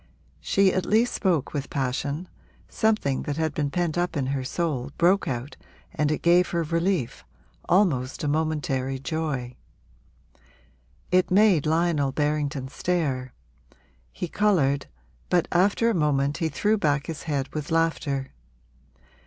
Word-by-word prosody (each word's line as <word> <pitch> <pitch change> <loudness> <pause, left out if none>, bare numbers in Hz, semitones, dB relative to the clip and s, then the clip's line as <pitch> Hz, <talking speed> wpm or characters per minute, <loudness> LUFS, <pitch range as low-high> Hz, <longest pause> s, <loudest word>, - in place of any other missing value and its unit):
She 195 -1 +2
at 185 - 0
least 225 +3 +3
spoke 170 - 0
with 145 -2 -3
passion; 140 +5 -2 0.4
something 215 - 0
that 145 0 -4
had 160 -2 0
been 145 -1 -1
pent 175 +1 -1
up 175 -2 -1
in 135 - 0
her 135 -2 -2
soul 140 -3 -2
broke 185 +4 +3
out 130 +2 -4 0.4
and 150 -1 0
it 155 - -2
gave 175 +1 +4
her 170 -1 0
relief, 165 -3 -1 0.5
almost 160 -7 +2
a - - 0
momentary 145 -4 -1
joy. 135 -4 -3 1.6
It 185 0 +3
made 185 -6 +4
Lionel 160 -3 +1
Berrington 145 -2 -1
stare; 135 -7 -2 0.8
he 180 - -5
coloured, 155 -9 +1 0.4
but 175 -2 +2
after 200 +6 +3
a - - 0
moment 145 -4 +1
he 160 - -1
threw 210 +8 +1
back 145 -5 +1
his 160 -3 -6
head 140 -2 -1
with 150 -1 -4
laughter. 160 -4 0
155 Hz, 135 wpm, -25 LUFS, 140-175 Hz, 1.6 s, gave